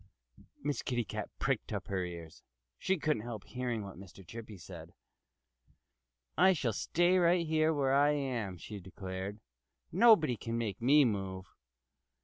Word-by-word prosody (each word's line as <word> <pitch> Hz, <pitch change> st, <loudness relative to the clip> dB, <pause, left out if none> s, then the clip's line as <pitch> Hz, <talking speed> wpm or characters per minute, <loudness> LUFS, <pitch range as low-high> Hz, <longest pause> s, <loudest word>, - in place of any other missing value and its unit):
Miss 145 Hz, 0 st, -1 dB
Kitty 120 Hz, -2 st, -1 dB
Cat -, -, -5 dB
pricked -, -, -1 dB
up -, -, -3 dB
her 95 Hz, -2 st, -1 dB
ears. 85 Hz, -3 st, -8 dB, 0.4 s
She 190 Hz, -, +1 dB
couldn't 150 Hz, -8 st, 0 dB
help 115 Hz, -3 st, -6 dB
hearing 120 Hz, -4 st, -3 dB
what 95 Hz, -3 st, -9 dB
Mr. 95 Hz, 0 st, -13 dB
Chippy 110 Hz, 0 st, -9 dB
said. 85 Hz, -, -11 dB, 1.4 s
"I 185 Hz, +5 st, +6 dB
shall 125 Hz, -9 st, -1 dB
stay 175 Hz, -, +2 dB
right 170 Hz, -1 st, +3 dB
where 155 Hz, -4 st, +2 dB
I 145 Hz, +1 st, +5 dB
am," 120 Hz, -10 st, -2 dB
she 105 Hz, +4 st, -8 dB
declared. 95 Hz, +2 st, -6 dB, 0.5 s
"Nobody 175 Hz, -, +5 dB
can 115 Hz, +3 st, -3 dB
make 110 Hz, -3 st, -3 dB
me 140 Hz, +4 st, +6 dB
move." 95 Hz, -4 st, -3 dB
115 Hz, 140 wpm, -32 LUFS, 100-150 Hz, 1.4 s, I